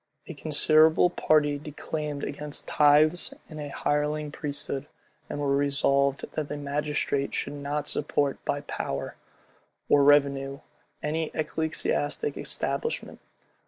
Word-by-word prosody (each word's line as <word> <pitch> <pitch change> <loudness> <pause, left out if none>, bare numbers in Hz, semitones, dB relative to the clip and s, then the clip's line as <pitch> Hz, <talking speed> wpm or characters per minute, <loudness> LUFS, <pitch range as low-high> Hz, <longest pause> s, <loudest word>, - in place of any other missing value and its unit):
A - - -7
considerable 155 +3 +4
party 150 -4 +2
declaimed 150 0 -5
against 145 0 -5
tithes 150 +3 +4
and 155 - -9
a 145 -1 -5
hireling 150 +1 -1
priesthood, 145 -1 -5 0.4
and 145 - -4
were 140 -1 +1
resolved 140 -1 +2
that 150 -2 -3
the 145 - -4
magistrate 145 -1 -1
should - - -2
not 145 +1 -3
support 145 -1 -1
by 145 - -1
power 70 - -4 0.8
or 145 -1 +5
revenue 140 -1 +3 0.4
any 155 +1 -1
ecclesiastical 155 - -1
establishment. 465 - -2
145 Hz, 115 wpm, -27 LUFS, 140-150 Hz, 0.8 s, or